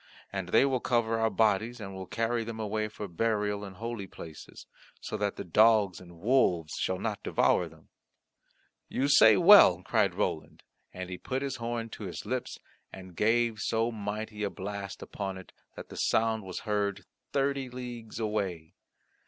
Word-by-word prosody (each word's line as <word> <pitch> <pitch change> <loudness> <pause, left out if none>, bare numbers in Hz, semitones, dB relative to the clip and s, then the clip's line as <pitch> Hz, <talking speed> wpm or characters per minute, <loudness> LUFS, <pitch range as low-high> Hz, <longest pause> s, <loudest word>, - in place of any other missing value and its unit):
And 95 -2 -3
they 135 - +5
will 135 -2 +1
also 120 - -1
recover 115 -1 0
our 110 0 +2
bodies, 110 +2 +1
and 95 -2 -7
will 95 -1 -7
carry 115 +3 -1
them 110 0 -6
away 110 0 -1
for 105 -1 -7
burial 105 +2 -1
in 95 -2 -8
holy 115 -1 -5
places, 80 -3 -11 0.3
so - - -5
that 105 -1 -1
the - - -5
dogs 105 0 +4
and 85 -1 -14
wolves 90 -8 +2
shall - - 0
not - - -3
devour - - +2
them." - - -20 1.0
"You 135 - 0
say 110 -7 +7
well," - - +8
cried - - +1
Roland, - - -3 0.3
and 90 0 -7
he 90 - -6
put 130 +1 -3
his 140 - -3
horn 115 -1 -3
to 110 - -8
his 90 - -6
lips, 130 -1 -3 0.3
and 95 -2 -11
gave 115 +2 +2
so 115 +3 0
mighty 105 0 -5
a 100 - 0
blast 100 0 -6
upon 95 -2 -5
it, 95 - -12 0.2
that - - -9
the - - -10
sound 110 0 +1
was 95 - -6
heard 100 -3 -1 0.3
thirty 140 -1 0
leagues 120 -3 -7
away. 100 -7 -2
110 Hz, 175 wpm, -29 LUFS, 95-115 Hz, 1.0 s, well